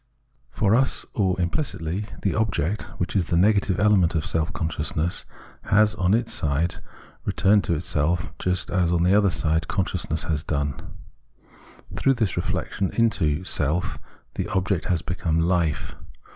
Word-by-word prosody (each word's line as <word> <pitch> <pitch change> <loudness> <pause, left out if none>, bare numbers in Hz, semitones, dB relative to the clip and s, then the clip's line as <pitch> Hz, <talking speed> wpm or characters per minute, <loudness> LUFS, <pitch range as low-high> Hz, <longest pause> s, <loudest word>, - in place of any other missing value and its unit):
For 105 -2 +1
us 130 +3 +2
or 95 -4 +1
impUcitly, 90 - -2 0.2
the 100 - +1
object, 105 -2 -1
which 90 +2 -3
is 95 -4 +2
the 85 - +1
negative 100 0 +3
element 100 -4 +4
for 80 - +1
self 80 +1 -1
consciousness, 80 +1 -2 0.4
has 105 +1 +4
on 95 +3 +2
its 115 0 -1
side 80 +4 0 0.5
returned 100 +1 +2
into 85 - +2
itself, 80 +1 -1
just 90 -1 -1
as 90 -2 +2
on 85 -1 +2
the 90 +2 +4
other 100 -1 +5
side 80 -1 0
consciousness 90 -5 -1
has 80 -2 -2
done. 70 -1 -1 1.2
Through 135 - +2
this 110 -6 0
reflexion 95 - -2
into 90 -9 +1
self, 80 0 -1 0.3
the - - -3
object 95 -3 0
has 90 -3 0
become 80 -2 -1
Life. 85 -2 0
90 Hz, 145 wpm, -24 LUFS, 80-100 Hz, 1.2 s, other